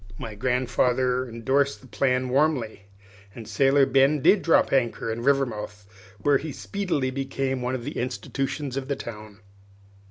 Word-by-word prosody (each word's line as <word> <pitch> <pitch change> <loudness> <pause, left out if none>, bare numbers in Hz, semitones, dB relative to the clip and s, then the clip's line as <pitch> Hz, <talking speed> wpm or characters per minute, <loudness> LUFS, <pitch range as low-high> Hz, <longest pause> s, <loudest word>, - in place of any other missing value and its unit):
My 110 - -6
grandfather 125 +2 0
indorsed 135 +5 0
the - - -17
plan 130 +1 0
warmly, 130 -7 0 0.5
and 115 -3 -9
Sailor 135 +6 +3
Ben 135 +3 +3
did 190 +8 +4
drop 165 - +3
anchor 120 -3 0
in 115 +1 -4
Rivermouth, 120 -6 -1 0.3
where 140 +6 +2
he 155 +1 -6
speedily 170 -8 -2
became 135 -1 -2
one 125 +1 -1
of 125 - -5
the 145 - -5
institutions 135 +2 -3
of 135 -1 -4
the 140 - -1
town. 105 -4 -9
130 Hz, 150 wpm, -25 LUFS, 120-140 Hz, 0.5 s, did